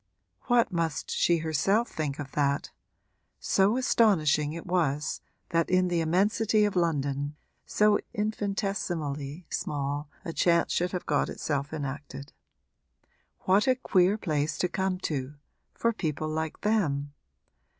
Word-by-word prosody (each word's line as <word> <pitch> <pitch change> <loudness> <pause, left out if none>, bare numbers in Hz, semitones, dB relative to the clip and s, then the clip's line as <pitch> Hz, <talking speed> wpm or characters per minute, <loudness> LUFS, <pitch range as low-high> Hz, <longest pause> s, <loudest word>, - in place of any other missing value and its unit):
What 240 -4 +3
must 165 -4 -2
she 170 - +3
herself 165 +9 +1
think 150 -3 -3
of 140 -2 -6
that? 140 -1 0 0.7
so 200 +5 +2
astonishing 160 - +3
it 165 +1 -7
was 150 -5 0 0.3
that 165 -1 +1
in 185 0 +3
the 170 -1 +1
immensity 210 +6 +2
of 205 - -1
London 145 -4 0 0.3
so 210 0 +3
infinitesimally 185 -8 -2
small 145 0 -2 0.2
a 165 - -4
chance 170 0 +2
should 180 +1 0
have 180 - -4
got 145 - +1
itself 145 -1 -3
enacted. 140 -1 -6 1.1
What 195 +5 +3
a 260 - +5
queer 195 -5 +2
place 155 -5 -1
to 180 - +1
come 190 +1 -1
to 140 -3 -3 0.4
for 230 0 +1
people 155 -6 -2
like 160 0 -3
them! 145 -10 0
165 Hz, 130 wpm, -28 LUFS, 145-195 Hz, 1.1 s, a